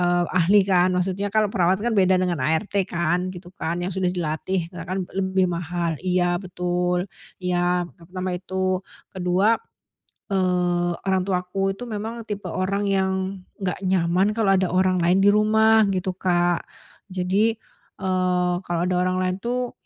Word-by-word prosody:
eee, 175 Hz, 0 st, +2 dB
ahli 185 Hz, +3 st, +4 dB
kan, 185 Hz, -1 st, +3 dB
maksudnya 190 Hz, +2 st, -1 dB
kalau 215 Hz, 0 st, +1 dB
perawat 185 Hz, -2 st, +3 dB
kan 240 Hz, -, +1 dB
beda 190 Hz, -2 st, +4 dB
dengan 180 Hz, -5 st, 0 dB
ART 185 Hz, +6 st, 0 dB
kan, 175 Hz, +2 st, 0 dB
gitu 180 Hz, -1 st, -9 dB
kan, 175 Hz, -1 st, -3 dB
yang 185 Hz, -, -3 dB
sudah 185 Hz, -1 st, 0 dB
dilatih 175 Hz, +1 st, -2 dB
ya 180 Hz, -, -8 dB
kan 185 Hz, 0 st, -2 dB
lebih 190 Hz, -1 st, +1 dB
mahal 175 Hz, -1 st, -2 dB
iya 175 Hz, -1 st, +1 dB
betul, 180 Hz, -1 st, -1 dB, 0.3 s
iya 180 Hz, -1 st, 0 dB, 0.2 s
pertama 185 Hz, +2 st, -5 dB
itu. 185 Hz, +1 st, -1 dB, 0.3 s
Kedua, 190 Hz, +4 st, +2 dB, 0.7 s
eee, 180 Hz, -2 st, +1 dB
orang 190 Hz, -1 st, 0 dB
tuaku 195 Hz, +1 st, -1 dB
itu 245 Hz, -, -8 dB
memang 225 Hz, +1 st, -5 dB
tipe 210 Hz, -2 st, -5 dB
orang 195 Hz, +2 st, -1 dB
yang 190 Hz, -1 st, +1 dB, 0.5 s
nggak 190 Hz, -1 st, -3 dB
nyaman 185 Hz, +1 st, +2 dB
kalau 210 Hz, -3 st, +2 dB
ada 185 Hz, -1 st, +1 dB
orang 185 Hz, -1 st, +2 dB
lain 180 Hz, +3 st, +4 dB
di 195 Hz, -, +4 dB
rumah, 220 Hz, +1 st, +5 dB
gitu 185 Hz, -1 st, -2 dB
Kak. 175 Hz, -2 st, +1 dB, 0.5 s
Jadi, 190 Hz, +5 st, +1 dB, 0.5 s
eee, 180 Hz, -1 st, +1 dB
kalau 170 Hz, -1 st, -1 dB
ada 180 Hz, 0 st, 0 dB
orang 185 Hz, 0 st, 0 dB
lain 185 Hz, 0 st, 0 dB
tuh, 245 Hz, +1 st, -2 dB
185 Hz, 155 wpm, -23 LUFS, 180-195 Hz, 0.7 s, rumah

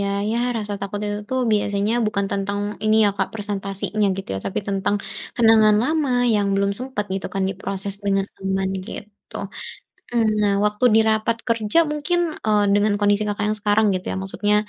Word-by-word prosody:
ya, 200 Hz, -, 0 dB, 0.2 s
ya, 230 Hz, -, 0 dB, 0.2 s
rasa 210 Hz, -2 st, -4 dB
takut 200 Hz, +1 st, -4 dB
itu 205 Hz, 0 st, -2 dB
tu -, -, -1 dB, 0.2 s
biasanya 205 Hz, +1 st, +1 dB
bukan 200 Hz, -1 st, 0 dB
tentang 200 Hz, 0 st, -2 dB, 0.3 s
ini, 215 Hz, 0 st, +4 dB
ya, -, -, +3 dB
Kak, 195 Hz, -1 st, 0 dB
persentasinya, 205 Hz, 0 st, -2 dB
gitu, 190 Hz, -, -6 dB
ya, -, -, -2 dB
tapi -, -, -2 dB
tentang 200 Hz, +1 st, 0 dB, 0.4 s
kenangan 220 Hz, -2 st, +5 dB
lama 300 Hz, +1 st, 0 dB, 0.2 s
yang 205 Hz, -1 st, +2 dB
belum 200 Hz, 0 st, +1 dB
sempat, 255 Hz, -4 st, -3 dB
gitu 190 Hz, -, -3 dB
kan, 195 Hz, -, 0 dB
diproses 195 Hz, +1 st, -4 dB
dengan 195 Hz, 0 st, +1 dB, 0.2 s
aman, 190 Hz, 0 st, 0 dB, 0.2 s
gitu. 210 Hz, -2 st, -10 dB, 0.7 s
Hmm, 230 Hz, -2 st, +2 dB
nah, 205 Hz, -, +3 dB
waktu 210 Hz, +3 st, 0 dB
di 225 Hz, -, +6 dB
rapat 220 Hz, +1 st, +1 dB
kerja 225 Hz, +3 st, +1 dB
mungkin, 300 Hz, +4 st, 0 dB, 0.3 s
eee, 210 Hz, -1 st, +3 dB
dengan 205 Hz, 0 st, +3 dB
kondisi 205 Hz, 0 st, +2 dB
Kakak 205 Hz, 0 st, -2 dB
yang -, -, -4 dB
sekarang, 210 Hz, +1 st, +3 dB
gitu, 185 Hz, 0 st, -4 dB
ya, -, -, -3 dB
maksudnya 205 Hz, +2 st, 0 dB
205 Hz, 180 wpm, -22 LUFS, 200-220 Hz, 0.7 s, di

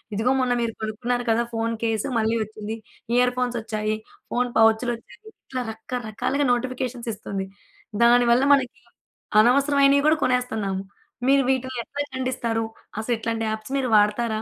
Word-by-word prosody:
ఇదిగో 225 Hz, +5 st, +2 dB
మొన్న 250 Hz, -1 st, +1 dB
మీరు 230 Hz, -1 st, -1 dB
కొనుక్కున్నారు 240 Hz, +3 st, -2 dB
కదా 235 Hz, +1 st, +2 dB
ఫోను 230 Hz, 0 st, -1 dB
కేసు 225 Hz, -2 st, 0 dB
మళ్ళీ 225 Hz, +1 st, +1 dB
ఒచ్చింది, 215 Hz, +1 st, -6 dB, 0.4 s
ఇయర్‌ఫోన్సొచ్చాయి, 240 Hz, -4 st, 0 dB, 0.4 s
ఫోను 245 Hz, 0 st, 0 dB
పౌచ్‌లొచ్చాయి. 225 Hz, -, +2 dB, 0.3 s
ఇట్లా 255 Hz, -1 st, -3 dB
రకరకాలుగా 245 Hz, +4 st, -2 dB
నోటిఫికేషన్స్ 250 Hz, -1 st, -3 dB
ఇస్తుంది. 200 Hz, -2 st, -5 dB, 0.6 s
దానివల్ల 240 Hz, +1 st, +5 dB
మనకి 255 Hz, -2 st, +1 dB, 0.6 s
అనవసరమైనవి 280 Hz, +3 st, +4 dB
గూడా 310 Hz, 0 st, +4 dB
కొనేస్తున్నాము. 220 Hz, -7 st, -1 dB, 0.5 s
మీరు 275 Hz, 0 st, +5 dB
వీటిని 260 Hz, -1 st, -2 dB
ఎట్లా 285 Hz, +5 st, -5 dB
ఖండిస్తారు? 235 Hz, -3 st, -1 dB, 0.3 s
అసలు 235 Hz, +2 st, 0 dB
ఇట్లాంటి 225 Hz, 0 st, -2 dB
యాప్స్‌ 220 Hz, +3 st, -6 dB
మీరు 265 Hz, -, 0 dB
వాడతారా? 215 Hz, +1 st, +1 dB
235 Hz, 125 wpm, -24 LUFS, 220-255 Hz, 0.6 s, దానివల్ల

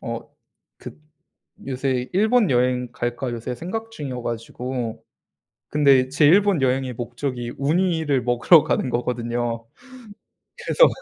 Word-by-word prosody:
어 -, -, -6 dB, 0.5 s
그 -, -, -9 dB, 0.7 s
요새 130 Hz, -1 st, -2 dB
'일본 220 Hz, +2 st, +3 dB
여행 125 Hz, 0 st, +1 dB
갈까?' 120 Hz, +1 st, -3 dB
요새 120 Hz, +2 st, -4 dB
생각 220 Hz, -, -5 dB
중이어 135 Hz, -, -6 dB
가지고 120 Hz, 0 st, -5 dB, 0.6 s
근데 140 Hz, -3 st, +4 dB
제 145 Hz, +3 st, +1 dB
일본 195 Hz, -2 st, +4 dB
여행의 130 Hz, 0 st, +1 dB
목적이 120 Hz, +1 st, -4 dB
우니를 160 Hz, -2 st, +1 dB
먹으러 120 Hz, +7 st, +5 dB
가는 130 Hz, -, 0 dB
거거든요. 120 Hz, -1 st, -2 dB, 1.0 s
그래서 -, -, +5 dB
130 Hz, 250 characters per minute, -22 LUFS, 120-150 Hz, 1.0 s, 먹으러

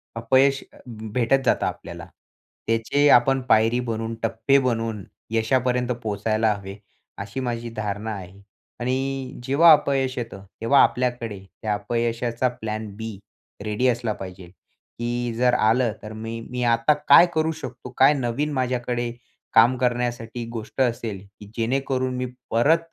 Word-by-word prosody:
अपयश 130 Hz, +4 st, +3 dB
अ, -, -, -17 dB
भेटत 115 Hz, +3 st, 0 dB
जातं -, -, +2 dB
आपल्याला, 85 Hz, 0 st, -6 dB, 0.6 s
त्याचे 115 Hz, +6 st, +2 dB
आपण 135 Hz, +2 st, +5 dB
पायरी 115 Hz, +3 st, +4 dB
बनून, 115 Hz, -2 st, -3 dB
टप्पे 115 Hz, +5 st, +2 dB
बनवून 115 Hz, -5 st, -1 dB, 0.3 s
यशापर्यंत 125 Hz, +2 st, +1 dB
पोहोचायला 110 Hz, +1 st, 0 dB
हवे, 100 Hz, 0 st, -8 dB, 0.4 s
अशी 100 Hz, +6 st, -5 dB
माझी 120 Hz, -2 st, -3 dB
धारणा 105 Hz, +1 st, -3 dB
आहे. 95 Hz, 0 st, -10 dB, 0.4 s
आणि 130 Hz, +2 st, -2 dB
जेव्हा 145 Hz, +6 st, +6 dB
अपयश 135 Hz, -3 st, +2 dB
येतं, 105 Hz, -5 st, -6 dB, 0.2 s
तेव्हा 135 Hz, +5 st, +5 dB
आपल्याकडे 120 Hz, -5 st, -1 dB, 0.2 s
त्या 110 Hz, -1 st, 0 dB
अपयशाचा 115 Hz, +2 st, -1 dB
प्लॅन 110 Hz, -3 st, -5 dB
बी 110 Hz, -2 st, -6 dB, 0.5 s
रेडी 105 Hz, +4 st, 0 dB
असला 120 Hz, -3 st, 0 dB
पाहिजे, 95 Hz, -1 st, -9 dB, 0.5 s
की 120 Hz, 0 st, -2 dB
जर 125 Hz, 0 st, +3 dB
आलं 115 Hz, 0 st, +2 dB
तर 110 Hz, 0 st, -7 dB
मी 115 Hz, +1 st, -6 dB
मी 125 Hz, 0 st, -3 dB
आता 115 Hz, +4 st, +3 dB
काय -, -, +9 dB
करू 160 Hz, 0 st, +1 dB
शकतो, 130 Hz, -6 st, -8 dB
काय 135 Hz, +3 st, +6 dB
नवीन 135 Hz, +3 st, -1 dB
माझ्याकडे 125 Hz, -2 st, -1 dB, 0.4 s
काम 120 Hz, +3 st, +6 dB
करण्यासाठी 120 Hz, -1 st, -2 dB
गोष्ट 115 Hz, +3 st, -5 dB
असेल, 115 Hz, -5 st, -1 dB, 0.2 s
की 105 Hz, -, -11 dB
जेणेकरून 130 Hz, +2 st, -1 dB
मी 125 Hz, -, -1 dB, 0.3 s
परत 145 Hz, +9 st, +4 dB
120 Hz, 135 wpm, -23 LUFS, 110-130 Hz, 0.6 s, काय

